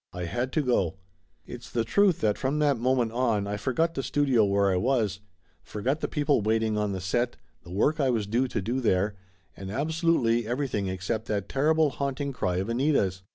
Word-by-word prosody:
I 90 - -5
had 120 +9 -2
to 155 - +1
go! 95 - +1 0.5
It's 120 -1 -9
the 115 - 0
truth 190 - +2
that 105 -2 +2
from 135 +2 -1
that 145 -5 +2
moment 125 -2 +1
on 115 -4 0
I 100 +1 -3
forgot 130 +10 0
the 135 - -2
studio 135 -3 +2
where 100 -1 +2
I - - +1
was, 110 -2 0 0.4
forgot 130 +8 -2
the - - -2
people 145 -4 +1
waiting 110 +1 +1
on 105 -1 0
the 95 - -3
set, 120 +6 -1 0.3
the - - -13
work 125 - +1
I 135 -3 +2
was 115 -4 0
due 120 +6 0
to 110 -5 -3
do 120 +6 -1
there, 100 -2 +1 0.4
and 95 0 -8
absolutely 140 - +1
everything 120 -5 -1
except 95 +4 -3
that 100 -2 -2
terrible 155 +2 +2
haunting 140 +1 -3
cry 90 -7 -1
of 95 +3 -1
Anita's. 115 -7 +1
120 Hz, 200 wpm, -27 LUFS, 100-135 Hz, 0.5 s, truth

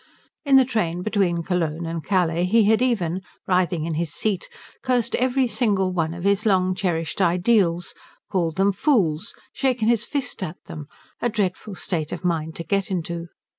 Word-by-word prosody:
In 280 -3 +4
the 265 -1 +7
train 180 -8 -1
between 185 -5 +1
Cologne 170 -2 -1
and 165 -1 -4
Calais 175 -3 +1
he 220 +4 +4
had 220 +3 +3
even, 190 -8 0 0.2
writhing 180 -3 +1
in 165 - -2
his 160 0 -2
seat, 200 +4 -2 0.3
cursed 245 -3 +1
every 255 +1 +2
single 205 -5 +1
one 165 -2 -1
of 175 - -7
his 200 +1 +2
long 185 -3 +2
cherished 175 -2 -2
ideals, 180 -1 +2 0.3
called 170 -5 -1
them 195 +1 +4
fools, 195 - +1 0.2
shaken 250 -5 0
his 230 -2 +3
fist 265 -3 -3
at 180 -2 -4
them; 150 -3 -8 0.3
a 240 - +1
dreadful 205 -1 -2
state 160 -4 -3
of - - -5
mind 160 -2 -1
to 170 - -5
get 195 +2 0
to. 170 -2 -4
185 Hz, 170 wpm, -23 LUFS, 170-220 Hz, 0.3 s, the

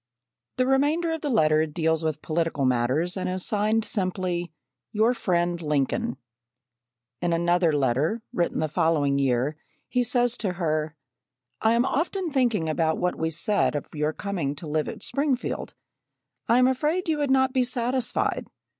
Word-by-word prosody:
The 255 - +2
remainder 295 +6 +2
of 320 -1 -3
the 295 - -2
letter 155 - +3
deals 160 0 0
with 155 -2 -2
political 165 -3 0
matters 130 +8 +1
and 185 -1 -2
is 185 0 -1
signed 215 +1 +1
simply 185 -4 -2 0.4
"Your 220 +3 +3
Friend 175 -6 0
Lincoln." 140 -4 -1 1.0
In 175 -1 +1
another 170 0 +2
letter 145 - 0
written 175 -7 0
the 155 - +1
following 145 -2 +1
year 135 +2 +1 0.3
he 250 -1 +1
says 245 0 +1
to 195 -5 -2
her: 155 -3 -1 0.7
"I 220 +1 +4
am 235 +2 +3
often 345 +4 -1
thinking 235 - +1
about 160 0 +1
what 180 0 0
we 160 - -1
said 170 +1 +1
of 145 - -4
your 150 0 0
coming 170 -6 -3
to 155 - -8
live 155 0 -1
at - - -6
Springfield. 275 -3 -1 0.7
I 235 - +4
am 250 - +5
afraid 300 +8 0
you 315 -2 0
would 290 -2 0
not 265 0 +3
be 260 -2 +3
satisfied. 250 0 -1
180 Hz, 160 wpm, -25 LUFS, 155-245 Hz, 1.0 s, am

